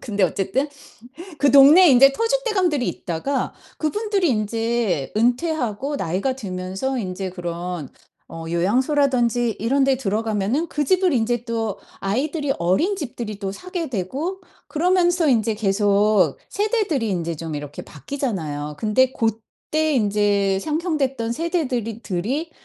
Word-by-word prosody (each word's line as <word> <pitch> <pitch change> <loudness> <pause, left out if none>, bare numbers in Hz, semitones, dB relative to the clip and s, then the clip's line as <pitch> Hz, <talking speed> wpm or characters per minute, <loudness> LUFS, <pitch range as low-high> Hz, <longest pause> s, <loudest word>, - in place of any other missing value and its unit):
근데 205 -4 0
어쨌든 195 - -1 0.7
그 280 0 +3
동네에 290 +6 +8
인제 270 +1 +7
터줏대감들이 430 - +1
있다가 195 +11 -2 0.2
그분들이 395 +1 0
인제 225 - -1
은퇴하고 250 +1 0
나이가 195 +10 -1
들면서 190 +5 -3
인제 185 -3 -4
그런 175 -3 -5 0.4
어 165 0 -7
요양소라든지 240 - +1
이런데 270 +3 +2
들어가면은 220 - -1
그 295 - -1
집을 370 +2 +3
인제 240 -1 0
또 225 -3 -2 0.2
아이들이 280 - -1
어린 190 - +1
집들이 235 - -6
또 195 -2 -3
사게 350 - -5
되고 270 - -3 0.3
그러면서 350 0 +2
인제 225 -4 +2
계속 205 -4 +2
세대들이 405 - 0
인제 170 -3 -2
좀 160 -1 -5
이렇게 145 0 -7
바뀌잖아요. 150 - -4
근데 250 +4 +2
고때 230 +8 -2
인제 205 -3 +2
상형됐던 290 - -1
세대들이 250 - -2
들이 250 - -2
235 Hz, 300 characters per minute, -22 LUFS, 195-295 Hz, 0.7 s, 동네에